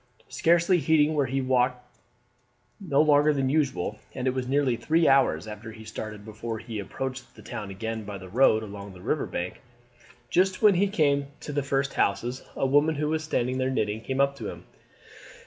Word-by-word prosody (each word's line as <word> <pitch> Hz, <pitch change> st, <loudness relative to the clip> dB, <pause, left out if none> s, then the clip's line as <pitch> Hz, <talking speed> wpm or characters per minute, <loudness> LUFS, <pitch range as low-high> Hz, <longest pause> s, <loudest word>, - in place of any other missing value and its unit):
Scarcely 170 Hz, +2 st, +3 dB
heeding 155 Hz, -1 st, +3 dB
where 145 Hz, -3 st, +1 dB
he 135 Hz, +1 st, -1 dB
walked 125 Hz, -1 st, +1 dB, 0.9 s
he 200 Hz, -, -10 dB
was 145 Hz, -4 st, +3 dB
out -, -, -1 dB
longer 150 Hz, +1 st, +5 dB
than 135 Hz, -1 st, +1 dB
usual, 135 Hz, -, 0 dB, 0.2 s
and 130 Hz, -, -3 dB
it 130 Hz, -, +2 dB
was 130 Hz, -1 st, -3 dB
nearly 135 Hz, -2 st, +2 dB
three 160 Hz, +7 st, +2 dB
hours 130 Hz, -12 st, +3 dB
after 110 Hz, +1 st, -8 dB
he 110 Hz, 0 st, -11 dB
started 110 Hz, -1 st, -7 dB
before 110 Hz, +1 st, -5 dB
he 110 Hz, -1 st, -6 dB
approached 130 Hz, +5 st, -6 dB
the -, -, -14 dB
town 110 Hz, -5 st, -6 dB
again 110 Hz, +3 st, -4 dB
by 100 Hz, -1 st, -6 dB
the 95 Hz, -1 st, -10 dB
road 110 Hz, +1 st, +3 dB
along 100 Hz, -1 st, -8 dB
the 90 Hz, -, -13 dB
river -, -, -1 dB
bank. 90 Hz, +1 st, -5 dB, 0.7 s
Just 185 Hz, +1 st, +2 dB
when 210 Hz, -2 st, +6 dB
he 190 Hz, +3 st, +2 dB
came 145 Hz, -8 st, +1 dB
to 145 Hz, -, -6 dB
the 145 Hz, -, +1 dB
first 140 Hz, 0 st, -1 dB
houses 120 Hz, +5 st, 0 dB
a -, -, 0 dB
woman, 145 Hz, +4 st, +3 dB
who 150 Hz, +1 st, -1 dB
was 155 Hz, 0 st, -1 dB
standing 130 Hz, -4 st, -1 dB
there 130 Hz, 0 st, +1 dB
knitting, 110 Hz, -4 st, -1 dB
came 130 Hz, +3 st, -3 dB
up 140 Hz, 0 st, +3 dB
to -, -, -5 dB
him. -, -, -10 dB
130 Hz, 200 wpm, -26 LUFS, 110-145 Hz, 0.9 s, when